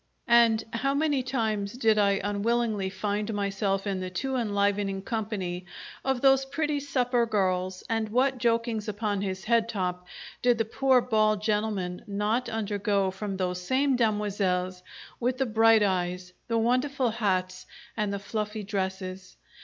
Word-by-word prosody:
And 230 -2 +5
how 275 +4 0
many 290 -2 +1
times 220 -6 -1
did 225 -4 +2
I 200 -1 +3
unwillingly 205 0 0
find 205 +2 -2
myself 200 -1 -1
in 195 -2 -1
the 185 0 -4
too 265 +9 -3
enlivening 200 -3 0
company 195 -5 -3 0.4
of 265 -2 0
those 270 -1 +5
pretty 295 +2 -1
supper 250 -4 +1
girls, 185 -3 0
and 225 -1 -1
what 255 +3 +1
jokings 230 -2 0
upon 205 -1 -2
his 190 -1 -3
head 230 0 +2
top 180 -3 -3 0.3
did 245 -1 +3
the 225 - +1
poor 260 +3 +3
bald 215 -3 +2
gentleman 210 -4 -1
not 210 +5 -1
undergo 205 -3 0
from 195 0 -5
those 180 -1 -2
same 265 +7 +2
demoiselles 200 -5 0 0.4
with 250 +1 0
the 265 - +1
bright 225 -1 +5
eyes, 180 -1 -1
the 230 - 0
wonderful 255 +2 +1
hats, 185 -4 -1 0.3
and 210 -2 -1
the 200 - -2
fluffy 210 +1 -4
dresses! 190 -2 -4
210 Hz, 145 wpm, -27 LUFS, 195-235 Hz, 0.4 s, And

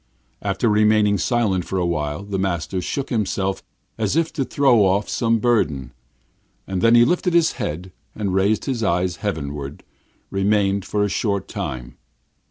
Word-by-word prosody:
After 100 +4 0
remaining 105 -1 +3
silent 105 -8 +1
for 95 - -3
a 90 - +1
while, 75 -1 -2
the 100 -1 -3
master 95 0 -2
shook 140 +9 -4
himself 95 -4 -1 0.4
as 110 +3 0
if 165 0 +1
to 140 - -1
throw 130 -5 +3
off 100 +2 +2
some 115 -1 +1
burden. 75 - 0 0.7
Then 95 +5 +3
he 120 0 +7
lifted 175 +4 +1
his 165 -1 +4
head, 90 +5 -5 0.2
and 100 -3 -2
raising 100 +7 +1
his 120 - -5
eyes 90 -1 0
heavenward, 75 -7 -4 0.5
remained 100 0 +1
so - - -13
for 105 -1 +1
a - - +2
short 100 -1 -1
time. - - -6
100 Hz, 160 wpm, -21 LUFS, 90-115 Hz, 0.7 s, he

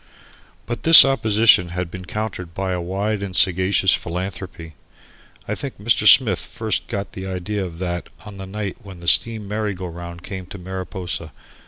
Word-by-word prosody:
But 120 -2 -5
this 165 -3 +10
opposition 110 -8 +3
had 90 -2 -3
been 95 -1 -8
countered 90 -4 -6
by 95 -1 -3
a 90 -1 -2
wide 100 +4 -3
and 95 -2 -5
sagacious 95 0 +3
philanthropy. 90 -2 -5 0.7
I - - -2
think 140 -2 -6
Mr. 105 0 +2
Smith 105 -9 +6
first 110 -3 -3
got 100 0 -5
the 95 0 -7
idea 95 +2 -4
of 85 -3 -7
that 85 -1 -4 0.2
on 105 -2 -10
the 95 - -7
night 100 -1 -5
when 95 -3 -12
the 85 - -11
steam 105 +7 +2
merry 105 -1 -3
go 90 +1 -7
round 85 0 -9
came 95 -2 -7
to 100 - -9
Mariposa. 90 -3 -5
95 Hz, 175 wpm, -21 LUFS, 90-105 Hz, 0.7 s, this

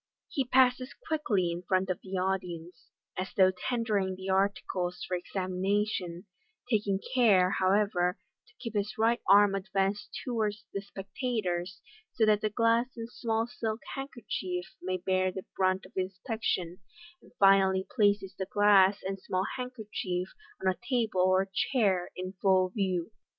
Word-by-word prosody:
He 270 - 0
passes 255 0 +3
quickly 210 - 0
in 170 +1 -4
front 185 +1 0
of 180 - -4
the 190 0 -5
audi 185 -1 -1
ence, 170 +2 -14 0.3
as 185 +1 -5
though 185 -1 +6
tendering 200 -1 -1
the 190 +1 -7
articles 190 -2 0
for 180 - -1
examination 185 0 -2 0.4
(taking 210 -5 +1
care, 200 -8 +5
however, 185 -2 +2 0.3
to 435 - -24
keep 230 -3 -6
his 205 0 -2
right 230 +2 +2
arm 200 0 +7
advanced 195 +1 -2
towards 215 -4 -2
the 195 - -2
spectators, 195 -3 -3 0.3
so 225 - +3
that 210 -1 +3
the 215 - 0
glass 230 +2 +2
and 230 +1 -6
small 225 -2 -1
silk 230 -2 -4
handkerchief 205 -9 -5
may 185 0 -2
bear 185 +1 +1
the 190 0 -7
brunt 185 0 +1
of 190 - -15
in 185 0 0
spection), 190 -3 -3 0.4
and - - -20
finally 195 -1 +5
places 205 -4 +2
the 190 - -4
glass 200 -1 +4
and 195 +1 -3
small 185 0 -1
handkerchief 210 -7 -4 0.3
on 190 - -2
a 185 - +1
table 225 -7 +1
or 185 +1 +4
chair 195 -7 +1
in 185 +1 -5
full 185 -2 +4
view. 185 -2 -1
195 Hz, 150 wpm, -30 LUFS, 185-220 Hz, 0.4 s, arm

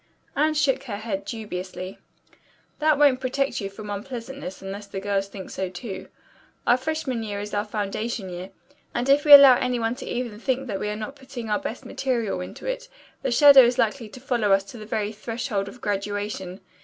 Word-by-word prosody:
Anne 310 +2 +2
shook 275 -2 +1
her 210 -6 -4
head 200 -3 -4
dubiously. 185 -4 -6 0.8
"That 305 -1 +3
won't 280 -3 +5
protect 270 0 -1
you 195 - -3
from 205 +1 -8
unpleasantness 230 0 -6
unless 200 +1 -7
the 195 - -5
girls 195 0 -1
think 195 -1 -9
so, 190 -1 -3
too. 190 +2 -7 0.6
Our 240 - +5
freshman 265 -3 -2
year 205 -2 -4
is 205 0 -6
our 205 0 +1
foundation 210 0 -3
year, 180 +2 -6 0.5
and 240 +2 0
if 280 +2 +4
we 295 - +4
allow 280 -3 +11
any 250 -1 0
one 230 0 -1
even 245 -1 -3
to 210 - -11
think 260 +2 -1
that 200 -6 -3
we 210 - -2
are 210 - -2
not 220 +6 -6
putting 260 -5 -7
our 210 - +2
best 230 - -6
material 235 -8 -1
into 180 - -8
it, - - -4 0.3
the - - -1
shadow 280 +2 +9
is 245 0 +3
likely 230 -1 0
to 250 - -11
follow 240 -6 0
us 195 0 +3
to 235 - -10
the 215 - -9
very 215 -1 -1
threshold 220 -1 -3
of 230 +4 -11
graduation. 205 -2 -3
225 Hz, 200 wpm, -25 LUFS, 200-260 Hz, 0.8 s, allow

